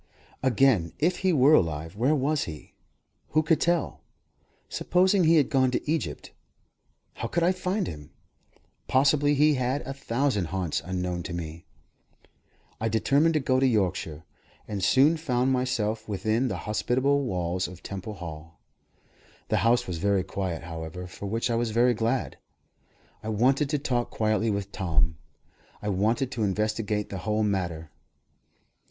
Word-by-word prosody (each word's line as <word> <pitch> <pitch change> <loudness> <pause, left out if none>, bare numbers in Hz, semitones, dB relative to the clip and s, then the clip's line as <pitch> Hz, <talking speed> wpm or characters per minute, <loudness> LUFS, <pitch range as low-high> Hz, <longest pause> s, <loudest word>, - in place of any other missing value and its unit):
Again, 130 -8 +3
if 175 +4 +1
he 190 -1 +1
were 145 -1 +5
alive, 80 - +1
where 130 +8 +2
was 145 +2 0
he? 75 -3 -9 0.6
Who 155 +1 +4
could 155 +1 +2
tell? 170 -3 0 0.7
Supposing 185 +1 +2
he 165 +1 +5
had 150 -3 +3
gone 130 -2 +3
to 125 - -3
Egypt, 160 +1 -2 0.8
how - - -4
could 170 - 0
I 175 - +4
find 185 +2 -1
him? 75 -2 -8 0.8
Possibly 145 +2 +3
he 150 +2 +4
had 130 +2 0
a 135 - -5
thousand 135 -6 -1
haunts 90 -1 -2
unknown 90 -1 -3
to 85 - -6
me. 85 -1 -6 1.1
I 115 - 0
determined 140 +8 +2
to - - +4
go 130 -2 +1
to 135 - +4
Yorkshire, 95 -8 -1 0.4
and 100 -3 -4
soon 140 - +4
found 130 -4 0
myself 115 -4 -1
within 110 +5 0
the - - -3
hospitable 130 +6 +1
walls 90 -6 -1
of 90 +1 -12
Temple 100 +2 -6
Hall. 80 -2 -9 0.9
The - - +2
house 120 +1 +3
was 90 -3 -4
very 100 0 +2
quiet, 90 -4 -4
however 80 +2 -6
for 95 +2 -8
which 115 +3 -1
I - - +1
was 115 0 0
very 120 +3 +3
glad. 115 +3 -1 0.8
I 110 - -5
wanted 130 +6 +2
to 150 - +1
talk 125 -4 -1
quietly 110 +1 0
with 100 -1 -2
Tom; 80 -4 0 0.6
I 105 - -4
wanted 110 +7 0
to 115 - -4
investigate 105 +1 -1
the 95 - -5
whole 110 +2 0
matter. 85 -6 -2
110 Hz, 155 wpm, -27 LUFS, 95-135 Hz, 1.1 s, were